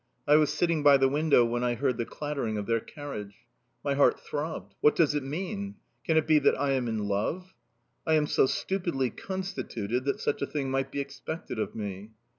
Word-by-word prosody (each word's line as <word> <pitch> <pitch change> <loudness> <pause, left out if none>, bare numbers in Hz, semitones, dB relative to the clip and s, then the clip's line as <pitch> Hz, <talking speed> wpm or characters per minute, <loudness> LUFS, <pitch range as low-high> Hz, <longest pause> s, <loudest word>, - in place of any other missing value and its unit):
I 145 - +7
was 150 -1 +4
sitting 165 0 +1
by 145 -1 +7
the 135 0 +4
window 145 -3 +4
when 120 +1 -1
I 120 -1 +1
heard 125 0 0
the 115 - -2
clattering 140 -7 -3
of 105 - -3
their 115 +1 +1
carriage. 110 -8 -8 0.5
My 140 - +2
heart 140 0 +4
throbbed... 145 - -5
What 150 - +5
does 155 -3 +3
it 145 - 0
mean? 195 +8 -4 0.3
Can 160 -3 +2
it 160 - +3
be 155 -1 +5
that - - +3
I 140 0 +1
am 130 -3 0
in 110 -2 -2
love?... 155 - -2 0.5
I 160 - +4
am 150 -1 +3
so 135 - +3
stupidly 170 - -1
constituted 130 - -4
that 140 - 0
such - - -1
a 140 - 0
thing 140 -3 -2
might 135 0 -1
be - - -3
expected 140 -1 -6
of - - -3
me. 100 -1 -5
140 Hz, 210 wpm, -28 LUFS, 120-155 Hz, 0.5 s, I